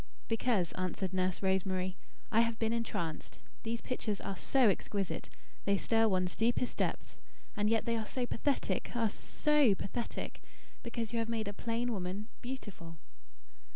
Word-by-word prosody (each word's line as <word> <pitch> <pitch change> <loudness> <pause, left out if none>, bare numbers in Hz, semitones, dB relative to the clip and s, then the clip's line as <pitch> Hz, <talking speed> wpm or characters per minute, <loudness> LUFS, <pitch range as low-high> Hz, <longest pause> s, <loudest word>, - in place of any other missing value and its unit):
"Because," 225 -6 +2
answered 185 +1 -2
Nurse 185 0 +1
Rosemary, 190 -1 +1 0.4
"I 225 - +5
have 230 -1 +3
been 225 0 +1
entranced. 175 -9 -2 0.2
These 230 +1 -2
pictures 215 -5 -1
are 195 - -3
so 260 +6 +4
exquisite. 200 -1 0 0.4
They 200 0 +4
stir 225 +2 +3
one's 185 -3 +1
deepest 240 +2 +1
depths. - - -2 0.4
And 210 -1 +2
yet 225 0 +2
they 230 - +1
are 220 -1 -3
so 255 -2 -1
pathetic 270 +4 0
ah, 230 -2 +3
SO 295 -1 +3
pathetic; 235 +5 -4 0.4
because 235 -1 -3
you 230 - +2
have 230 0 -1
made 225 -2 -1
a 205 - -2
plain 235 +3 -1
woman, 195 +3 -3
beautiful." 205 -10 -6
220 Hz, 155 wpm, -34 LUFS, 190-235 Hz, 0.4 s, I